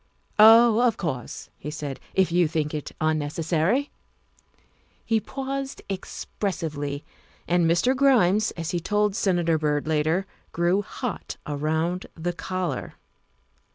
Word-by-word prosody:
" - - -35
Oh, 225 +1 +8
of 235 -3 +3
course," 130 -9 -5
he 150 - -6
said, 145 -3 -5
" - - -32
if 190 -3 +3
you 175 -1 +3
think 150 -1 -2
it 150 -2 -4
unneces 155 0 -1
sary 180 - +1 0.4
' - - -36
' - - -39 0.3
He 225 -1 +2
paused 270 +3 -5
expressively, 155 -7 -4 0.4
and 175 -1 +3
Mr. 175 +11 +3
Grimes, 220 -7 +4
as 165 -1 -3
he 175 - 0
told 210 +2 +1
Senator 175 -6 +1
Byrd 150 -1 0
later, 160 +4 +1 0.3
grew 175 +4 +2
hot 240 +3 -5
around 160 +5 -1
the 175 +2 -3
collar. 185 0 -4
175 Hz, 140 wpm, -25 LUFS, 155-210 Hz, 0.4 s, Oh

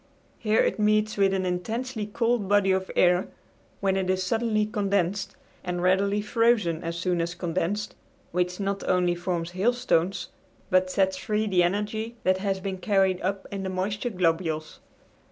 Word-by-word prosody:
Here 220 -1 +2
it - - 0
meets 215 0 +2
with 195 -1 +3
an 190 -1 0
intensely 220 +5 -3
cold 230 -1 0
body 205 -2 +4
of 190 0 0
air, 180 0 +4 0.5
when 195 -1 +2
it 190 -1 -1
is 185 0 +1
suddenly 215 +1 +1
condensed 200 -3 -1 0.3
and 180 -1 -3
readily 200 +3 +2
frozen 210 -7 +2
as 170 0 -3
soon 175 -1 0
as 170 +1 -3
condensed, 185 +4 -2 0.4
which 180 +1 -1
not 195 0 -2
only 180 -1 +3
forms 175 -1 -3
hailstones, 195 -3 +1 0.4
but 185 0 +3
sets 190 0 +1
free 210 +3 -1
the 185 -4 +3
energy 210 +5 -1
that 185 0 +3
has 195 -1 -1
been 190 -1 -4
carried 190 -2 +2
up 190 +1 -2
in 200 -1 -4
the 190 - -3
moisture 200 +5 -2
globules. 165 -5 -1
190 Hz, 160 wpm, -26 LUFS, 180-210 Hz, 0.5 s, body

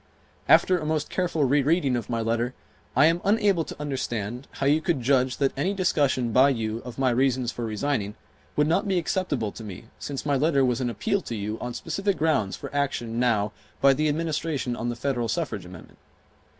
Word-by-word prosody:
After 185 -1 +5
a 155 - -5
most 155 -1 -1
careful 175 -4 0
re 140 +2 +3
reading 145 -2 +2
of 120 -3 -4
my 115 -1 -1
letter, 115 +3 -1 0.4
I 135 +4 +6
am 165 +2 +3
unable 200 -4 +3
to - - -9
understand 125 -4 -3
how 135 - -3
you 150 +3 +4
could 160 -6 0
judge 130 -1 +2
that 135 -1 +1
any 185 +9 0
discussion 140 -10 +1
by 130 +5 +6
you 115 -4 -2
of 120 0 -9
my 130 -2 +2
reasons 125 -1 +1
for 120 - -4
resigning 110 -2 -2 0.4
would 150 - +3
not 180 +7 +1
be 190 -2 +1
acceptable 160 - -1
to 115 - -10
me 105 +2 -9
since 140 -1 -5
my 145 -1 +2
letter 140 -1 +3
was 125 0 0
an 125 - 0
appeal 200 - -1
to 115 - -5
you 105 +1 -4
on 125 0 -5
specific 195 +4 -1
grounds 150 -11 +1
for - - -8
action 120 -5 -1
now 110 -4 +2 0.3
by 140 0 +6
the 155 +3 +1
Administration 150 -4 -1
on 120 0 -3
the 120 - -2
Federal 125 -1 -1
Suffrage - - -3
amendment. - - -13
135 Hz, 200 wpm, -26 LUFS, 120-155 Hz, 0.4 s, I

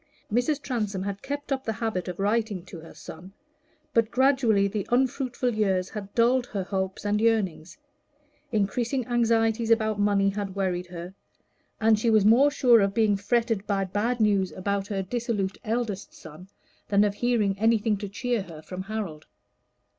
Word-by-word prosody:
Mrs. 245 +5 +1
Transome 210 -7 -2
had 200 0 -4
kept 285 0 -5
up 265 -1 -1
the 225 - -2
habit 215 -4 -3
of 180 - -5
writing 205 -2 -1
to 175 -2 -10
her 160 -1 -13
son, 160 +4 -11 0.6
but 230 -1 +3
gradually 250 -6 +3
the 200 0 -4
unfruitful 250 0 0
years 190 -4 0
had 200 -2 -7
dulled 245 +2 +3
her 195 -3 -3
hopes 190 +1 -3
and 210 +1 +1
yearnings; 190 -8 0 0.7
increasing 235 +4 0
anxieties 230 -1 +1
about 220 -2 +2
money 200 -1 +3
had 200 -1 -4
worried 180 -2 -1
her, 175 +1 -8 0.7
and 220 -1 +4
she 230 - +1
was 215 -3 +4
more 245 +7 +6
sure 245 -6 +5
of 195 0 0
being 215 -3 +3
fretted 220 +1 0
by 195 -2 0
bad 215 +6 -1
news 200 -3 +2
about 200 +1 -2
her 195 -2 -2
dissolute 210 -2 -2
eldest 220 -3 -3
son 160 +4 -12 0.4
than 205 0 +4
of 205 -1 +1
hearing 215 -3 +1
anything 225 -1 +2
to 205 0 -6
cheer 240 +2 -1
her 165 -5 -10
from 185 +2 -6
Harold. 190 -7 -5
210 Hz, 165 wpm, -26 LUFS, 195-230 Hz, 0.7 s, more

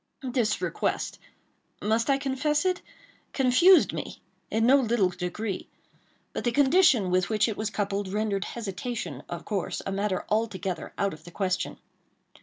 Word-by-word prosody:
This 245 -4 0
request—must 225 +4 -3
I 275 - +4
confess 285 +3 0
it?—confused 350 -2 +2
me - - -5 0.3
in 225 +1 +1
no 265 +3 +7
little 230 -7 +2
degree. 180 +3 -4 0.7
But - - -3
the 240 - +1
condition 275 - +4
with 185 0 +2
which 215 0 +2
it 220 - -2
was 215 0 -2
coupled 200 -2 -2
rendered 205 0 -1
hesitation, 200 - -5
of 175 -1 -6
course, 200 -4 -2
a - - -2
matter 195 -1 -1
altogether 195 -6 -2
out 200 -1 0
of 155 0 -12
the 175 - -11
question. 185 0 -2
215 Hz, 140 wpm, -27 LUFS, 190-250 Hz, 0.7 s, no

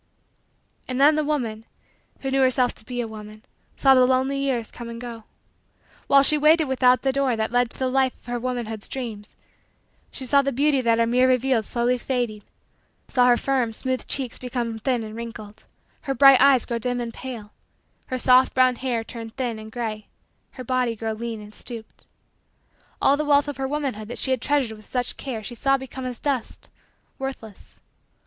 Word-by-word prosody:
And 255 0 -3
then 290 +3 +6
the 305 0 +1
woman, 240 -8 -2 0.6
who 270 - -3
knew 270 0 +2
herself 255 -1 +3
to 220 - -16
be 245 0 -3
a 235 - -4
woman, 215 0 -11 0.3
saw 270 -1 +5
the 255 -1 +5
lonely 260 +2 +1
years 255 -5 -1
come 235 -1 -8
and 230 0 -7
go. 235 -2 -8 0.8
While 275 0 +6
she 300 +2 +5
waited 315 +2 +5
without 255 -1 +3
the 270 - +2
door 270 -2 +1
that 220 0 -2
led 245 0 +2
to - - -2
the 260 - 0
life 260 0 +1
of - - -29
her 245 0 -3
womanhood's 235 -3 -4
dreams, 220 -6 -7 0.7
she 265 - -4
saw 280 +3 +4
the 275 0 -1
beauty 280 +1 +2
that 230 -2 +2
her 230 - +3
mirror 250 +2 +3
revealed 255 -3 +2
slowly 245 +2 0
fading 240 -5 -2 0.7
saw 250 -2 +3
her 240 -1 +5
firm, 255 -4 0
smooth, 260 +3 -2
cheeks 260 -4 -1
become 240 -3 -3
thin 245 0 0
and 215 0 -8
wrinkled, 225 -2 -9 0.4
her 270 -2 -3
bright 275 +1 +7
eyes 275 -3 +5
grow 235 -1 -3
dim 245 +2 -1
and 235 -1 -4
pale, 230 -5 -8 0.6
her 255 - -2
soft, 255 +1 +4
brown, 255 -1 +4
hair 245 -3 -2
turn 230 -1 -8
thin 235 -2 -4
and 220 0 -10
gray, 220 -3 -4 0.5
her 255 - -8
body 250 -1 0
grow 225 0 -3
lean 230 0 -5
and 210 0 -12
stooped. 230 -2 -10 0.9
All 275 - +4
the 305 - -1
wealth 290 -1 +3
of 290 -3 -5
her 270 0 -2
womanhood 270 -7 -3
that 240 - -7
she 265 - 0
had 255 -3 0
treasured 275 -6 0
with 215 -1 -17
such 250 -1 -2
care 240 -6 -6
she 225 - -6
saw 275 +3 +2
become 265 0 -8
as 250 -2 -5
dust, 275 -5 -3 0.5
worthless. 265 -6 -8
250 Hz, 195 wpm, -24 LUFS, 230-265 Hz, 0.9 s, bright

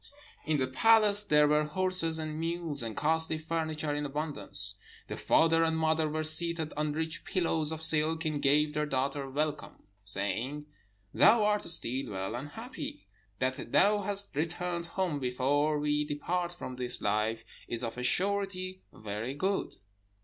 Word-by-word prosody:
"In 155 -1 +2
the 130 - +1
palace 210 +9 +4
there 150 -7 +4
were 150 +1 +3
horses 165 0 0
and 155 -1 -4
mules, 165 -3 -3
and 115 +2 -5
costly 160 +2 +1
furniture 155 -1 -3
in 145 0 -2
abundance. 145 -9 -1 0.3
The - - -6
father 165 0 +3
and 160 0 +1
mother 160 -1 +1
were 155 +1 -2
seated 160 0 +3
on 150 0 -1
rich 160 +1 -3
pillows 165 -4 +1
of 160 0 -4
silk, 160 +1 +4
and 150 -2 -1
gave 150 +2 +3
their 150 0 -1
daughter 135 0 -2
welcome, 150 +2 -3 0.2
saying, 120 +9 -2 0.5
'Thou 225 0 +6
art 210 0 +1
still 130 -5 0
well 95 -1 -4
and 135 +4 -6
happy. 260 - -8 0.3
That 130 +2 -3
thou 205 +1 +4
hast 200 -3 -2
returned 170 +2 -2
home 175 -4 -2
before 140 +4 0
we 150 0 0
depart 170 +4 -2
from 130 -7 -8
this 125 -1 -3
life 110 +2 -1 0.2
is 120 +1 -3
of 115 - -4
a 125 - -5
surety 185 +3 -1
very 110 +5 -5
good.' 190 +6 -1
155 Hz, 155 wpm, -30 LUFS, 140-170 Hz, 0.5 s, Thou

